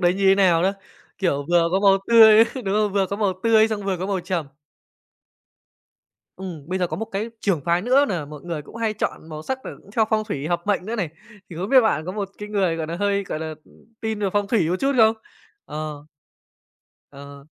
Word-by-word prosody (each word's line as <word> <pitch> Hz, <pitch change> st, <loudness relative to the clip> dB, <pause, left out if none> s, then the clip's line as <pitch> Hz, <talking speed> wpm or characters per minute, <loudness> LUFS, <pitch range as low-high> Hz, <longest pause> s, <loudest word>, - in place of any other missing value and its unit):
đấy 175 Hz, -1 st, +3 dB
như 195 Hz, +1 st, -2 dB
thế 190 Hz, -, +7 dB
nào 180 Hz, -4 st, +3 dB
nữa, 190 Hz, +2 st, +2 dB, 0.5 s
kiểu, 145 Hz, -7 st, -1 dB
vừa 170 Hz, -1 st, +4 dB
có 190 Hz, -, +2 dB
màu 195 Hz, -1 st, +5 dB
tươi, 225 Hz, -1 st, +8 dB
đúng 210 Hz, -7 st, -3 dB
không? 210 Hz, -1 st, +1 dB
Vừa 195 Hz, -1 st, +1 dB
có 200 Hz, -, -4 dB
màu 205 Hz, -2 st, +1 dB
tươi 225 Hz, -1 st, +4 dB
xong 215 Hz, -2 st, -3 dB
vừa 195 Hz, -1 st, -1 dB
có 185 Hz, -, -3 dB
màu 195 Hz, -2 st, -1 dB
trầm. 175 Hz, -3 st, -3 dB, 1.9 s
Ừm, 170 Hz, -6 st, -8 dB
bây 185 Hz, +1 st, -1 dB
giờ 180 Hz, -, +1 dB
có -, -, -5 dB
một 225 Hz, -, -3 dB
cái 215 Hz, +2 st, -4 dB
trưởng 190 Hz, -7 st, 0 dB
phái 170 Hz, +1 st, +1 dB
nữa 260 Hz, +5 st, +4 dB
nà 170 Hz, -6 st, -2 dB
mọi 150 Hz, 0 st, -10 dB
người 170 Hz, -3 st, -5 dB
cũng 220 Hz, -, -13 dB
hay 225 Hz, -2 st, -1 dB
chọn 180 Hz, -5 st, -4 dB
màu 155 Hz, -1 st, -7 dB
sắc 260 Hz, +10 st, -3 dB
cà -, -, -5 dB, 0.2 s
c -, -, -18 dB
theo 225 Hz, -, +4 dB
phong 215 Hz, -1 st, +1 dB
thủy 150 Hz, -9 st, -4 dB
hợp 175 Hz, -1 st, -1 dB
mệnh 205 Hz, -3 st, 0 dB
nữa 230 Hz, +2 st, -3 dB
này. 190 Hz, -7 st, -1 dB, 0.4 s
Thì 165 Hz, -, -8 dB
không 185 Hz, +4 st, -3 dB
biết 265 Hz, +1 st, +7 dB
bạn 165 Hz, -, 0 dB
có 185 Hz, -, -3 dB
một 200 Hz, -1 st, -4 dB
cái 210 Hz, -, -7 dB
người, 195 Hz, -5 st, 0 dB
gọi 160 Hz, -1 st, -3 dB
nà, 165 Hz, +2 st, -4 dB
hơi, 200 Hz, +1 st, 0 dB
gọi 165 Hz, -, -4 dB
là, 160 Hz, 0 st, -5 dB
ưm, -, -, -22 dB, 0.3 s
tin 220 Hz, -1 st, -3 dB
về 200 Hz, -, +1 dB
phong 205 Hz, -1 st, +1 dB
thủy 200 Hz, -8 st, +2 dB
một 180 Hz, -, +1 dB
chút 275 Hz, +1 st, +2 dB
không? 220 Hz, -1 st, +6 dB, 0.5 s
Ờ. 150 Hz, -1 st, -6 dB, 1.1 s
Ờ. 140 Hz, 0 st, -12 dB
195 Hz, 240 wpm, -22 LUFS, 170-215 Hz, 1.9 s, tươi